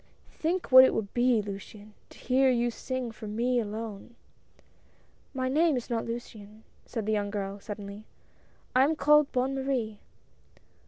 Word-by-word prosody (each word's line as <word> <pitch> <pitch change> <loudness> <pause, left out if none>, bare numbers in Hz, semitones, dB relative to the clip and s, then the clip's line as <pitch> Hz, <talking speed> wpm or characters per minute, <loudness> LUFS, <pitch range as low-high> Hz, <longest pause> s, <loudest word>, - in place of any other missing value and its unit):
Think 345 -1 -2
what 260 0 +11
it 260 - +3
would 205 -3 -3
be, 240 -3 +2
Luciane, 205 +1 -9 0.2
to - - -16
hear 265 +1 +2
you 240 -1 +1
sing 255 0 -4
for 215 -1 -9
me 240 +4 0
alone 220 +1 -6 0.6
" - - -35
"My 260 -1 -1
name 305 +2 +2
is 245 - -6
not 230 -1 -1
Luciane," 220 -2 -8 0.2
said 225 -4 -4
the 215 - 0
young 205 -1 -1
girl 200 -1 -4
suddenly; 205 0 -8 0.7
"I 255 - +6
am 310 +4 +2
called 300 -1 +4
Bonne 255 +2 0
Marie." 260 -6 -2
235 Hz, 160 wpm, -28 LUFS, 210-260 Hz, 0.7 s, what